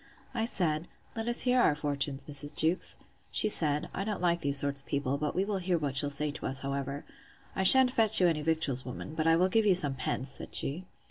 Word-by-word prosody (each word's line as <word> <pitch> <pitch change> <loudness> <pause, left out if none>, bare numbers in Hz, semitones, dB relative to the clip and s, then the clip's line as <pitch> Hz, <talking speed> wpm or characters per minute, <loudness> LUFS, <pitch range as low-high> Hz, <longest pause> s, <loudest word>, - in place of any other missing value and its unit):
I 225 -3 -2
said, 165 -7 -1 0.3
Let 225 0 -5
us 240 - +5
hear 250 0 +2
our 150 - +2
fortunes, 145 -2 -3
Mrs. 145 0 -2
Jewkes. 165 +3 0 0.3
She - - +1
said, 150 -7 0
I 195 - -4
don't 210 -1 -4
like 170 -1 0
these 140 0 +1
sort 140 0 +3
of 135 - -14
people; 140 -1 -2
but 150 0 -4
we 190 - -1
will 200 -2 -3
hear 180 -1 -1
what 145 -4 -4
she'll 140 +1 +4
say 150 +1 -2
to 150 - -7
us, 130 0 -3
however. 140 +1 -5 0.5
I - - -2
shan't 255 +6 +7
fetch 220 -3 +4
you 180 - +3
any 160 -3 -1
victuals, 150 -5 -1
woman; 130 +4 -9
but 160 0 -2
I 165 - +4
will 180 +3 +2
give 215 +3 0
you 190 - +3
some 145 -6 +4
pence, 130 0 -3
said 135 - -4
she. 165 +7 0
155 Hz, 240 wpm, -29 LUFS, 140-185 Hz, 0.5 s, shan't